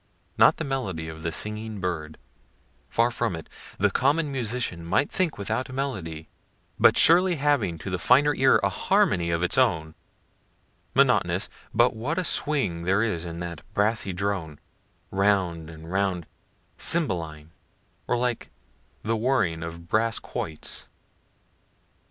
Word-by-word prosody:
Not -, -, +5 dB
the -, -, -3 dB
melody 100 Hz, -13 st, -3 dB
of 80 Hz, 0 st, -9 dB
the 85 Hz, +1 st, -2 dB
singing 105 Hz, +3 st, -4 dB
bird 85 Hz, -4 st, -4 dB, 0.7 s
far 120 Hz, +1 st, +2 dB
from 115 Hz, -5 st, -1 dB
it; 80 Hz, -, -8 dB, 0.3 s
the 100 Hz, +1 st, +2 dB
common 145 Hz, -, +1 dB
musician 120 Hz, -9 st, -3 dB
might 105 Hz, +11 st, +1 dB
think 180 Hz, -4 st, 0 dB
without 105 Hz, +6 st, -3 dB
melody, 95 Hz, -, -4 dB, 0.5 s
but -, -, +6 dB
surely 180 Hz, +2 st, +6 dB
having 140 Hz, -, +1 dB
to 95 Hz, +4 st, -7 dB
the 90 Hz, -, -2 dB
finer 140 Hz, +9 st, +4 dB
ear 135 Hz, -2 st, +4 dB
a -, -, +3 dB
harmony 85 Hz, -1 st, +1 dB
of 85 Hz, +1 st, 0 dB
its 90 Hz, +8 st, +1 dB
own; 80 Hz, -11 st, +1 dB, 1.0 s
monotonous -, -, +3 dB, 0.2 s
but 120 Hz, 0 st, +3 dB
what 130 Hz, +9 st, -3 dB
a 185 Hz, -, +1 dB
swing 140 Hz, -, 0 dB
there 95 Hz, +4 st, +2 dB
is 90 Hz, -7 st, -2 dB
in 85 Hz, 0 st, -6 dB
that 85 Hz, -2 st, -6 dB
brassy 105 Hz, -1 st, +1 dB
drone, 90 Hz, -5 st, -3 dB, 0.5 s
round 95 Hz, -5 st, +1 dB
and 80 Hz, +1 st, -11 dB
round, 95 Hz, -3 st, 0 dB, 0.5 s
cymballine 80 Hz, -, +1 dB, 0.6 s
or 125 Hz, -, +1 dB
like 120 Hz, -1 st, -2 dB, 0.5 s
the 115 Hz, +2 st, 0 dB
whirling 110 Hz, -9 st, 0 dB
of 85 Hz, +1 st, -7 dB
brass 110 Hz, +4 st, +1 dB
quoits. 80 Hz, -2 st, -6 dB
100 Hz, 140 wpm, -25 LUFS, 85-125 Hz, 1.0 s, but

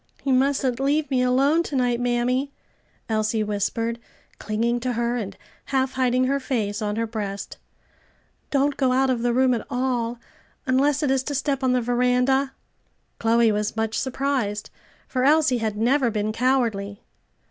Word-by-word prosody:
"You 270 Hz, -, +1 dB
mustn't 265 Hz, -1 st, +1 dB
leave 290 Hz, +1 st, 0 dB
me 255 Hz, -1 st, +2 dB
alone, 270 Hz, +6 st, +3 dB
to 305 Hz, -4 st, -5 dB
night, 245 Hz, -2 st, +1 dB
mammy," 245 Hz, +3 st, 0 dB, 0.6 s
Elsie 215 Hz, -1 st, 0 dB
whispered, 225 Hz, +3 st, -2 dB, 0.4 s
clinging 230 Hz, +3 st, -1 dB
to 250 Hz, +1 st, -2 dB
her, 235 Hz, +1 st, -1 dB
and 200 Hz, -5 st, -5 dB, 0.3 s
half 265 Hz, -1 st, 0 dB
hiding 255 Hz, -1 st, +2 dB
her 275 Hz, +2 st, +1 dB
face 220 Hz, -6 st, -2 dB
on 210 Hz, -1 st, -1 dB
her 230 Hz, +1 st, 0 dB
breast. 205 Hz, -3 st, -5 dB, 0.9 s
"Don't 280 Hz, 0 st, +1 dB
go 260 Hz, -2 st, +2 dB
out 265 Hz, 0 st, +3 dB
of 240 Hz, -2 st, -1 dB
the 240 Hz, 0 st, +1 dB
room 255 Hz, +1 st, +3 dB
at 230 Hz, -, -2 dB
all, 245 Hz, -2 st, -1 dB, 0.5 s
unless 275 Hz, +3 st, +2 dB
it 280 Hz, -, +2 dB
is 270 Hz, -1 st, +2 dB
to 290 Hz, -, -3 dB
step 275 Hz, 0 st, -1 dB
on 255 Hz, -1 st, +3 dB
the 250 Hz, -, +2 dB
veranda." 250 Hz, +3 st, +1 dB, 0.7 s
Chloe 230 Hz, 0 st, +3 dB
was 210 Hz, +1 st, -1 dB
much 225 Hz, 0 st, -1 dB
surprised, 260 Hz, -6 st, -2 dB, 0.4 s
for 255 Hz, -1 st, -1 dB
Elsie 290 Hz, -3 st, +4 dB
had 215 Hz, -2 st, -2 dB
never 250 Hz, +3 st, +2 dB
been 215 Hz, -1 st, -1 dB
cowardly. 225 Hz, -5 st, 0 dB
250 Hz, 160 wpm, -24 LUFS, 225-265 Hz, 0.9 s, Elsie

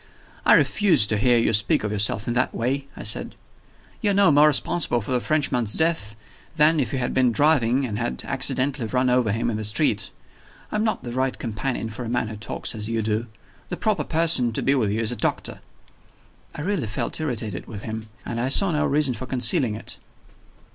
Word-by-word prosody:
"I -, -, +8 dB
refuse 195 Hz, -, +4 dB
to 105 Hz, -, -1 dB
hear 120 Hz, +1 st, +3 dB
you 115 Hz, -1 st, +1 dB
speak 105 Hz, 0 st, +2 dB
of 105 Hz, -, -2 dB
yourself 105 Hz, 0 st, +1 dB
in 120 Hz, -, 0 dB
that 125 Hz, +1 st, 0 dB
way," 135 Hz, +4 st, -2 dB
I -, -, -7 dB
said. -, -, 0 dB, 0.7 s
"You 210 Hz, -, +1 dB
are -, -, +2 dB
no 200 Hz, -4 st, +5 dB
more 145 Hz, +1 st, +6 dB
responsible 150 Hz, -3 st, +2 dB
for 110 Hz, -, -7 dB
the 125 Hz, -, +2 dB
Frenchman's 125 Hz, -6 st, 0 dB
death 160 Hz, -11 st, 0 dB, 0.4 s
than 155 Hz, +1 st, +4 dB
if 130 Hz, -, -1 dB
you 135 Hz, -, -2 dB
had 125 Hz, -1 st, -2 dB
been 130 Hz, -2 st, +3 dB
driving, 135 Hz, -1 st, +2 dB
and 105 Hz, -4 st, -4 dB
had 65 Hz, -, -3 dB
accidentally 130 Hz, -3 st, 0 dB
run 125 Hz, +2 st, +1 dB
over 125 Hz, -4 st, +2 dB
him 115 Hz, +3 st, -1 dB
in 105 Hz, -, -3 dB
the 110 Hz, -, -4 dB
street. 105 Hz, 0 st, +1 dB, 0.6 s
I -, -, -4 dB
am 215 Hz, -, 0 dB
not 220 Hz, -, -1 dB
the 120 Hz, -, -6 dB
right 130 Hz, +1 st, -1 dB
companion 115 Hz, 0 st, -4 dB
for 125 Hz, -, -7 dB
a 115 Hz, -, -5 dB
man 120 Hz, -2 st, -1 dB
who 110 Hz, -, -7 dB
talks 110 Hz, +2 st, -4 dB
as 105 Hz, -1 st, -4 dB
you 115 Hz, -1 st, -1 dB
do. 110 Hz, +2 st, -1 dB, 0.4 s
The 175 Hz, -, -4 dB
proper 215 Hz, -2 st, 0 dB
person 160 Hz, -7 st, +2 dB
to -, -, -2 dB
be 135 Hz, -, +3 dB
with 120 Hz, -7 st, +1 dB
you 110 Hz, +3 st, -1 dB
is 110 Hz, -, +1 dB
a -, -, -2 dB
doctor." 110 Hz, -, -3 dB, 0.9 s
I -, -, -6 dB
really 175 Hz, -, -2 dB
felt 110 Hz, -, -4 dB
irritated 110 Hz, -, -4 dB
with 105 Hz, -4 st, -8 dB
him 110 Hz, -1 st, -6 dB, 0.2 s
and 115 Hz, 0 st, -3 dB
I 130 Hz, -, -1 dB
saw 195 Hz, +6 st, +2 dB
no 150 Hz, -, 0 dB
reason 145 Hz, -2 st, +1 dB
for 120 Hz, +3 st, -7 dB
concealing 130 Hz, -, +2 dB
it. 110 Hz, -, -9 dB
125 Hz, 215 wpm, -23 LUFS, 110-145 Hz, 0.9 s, I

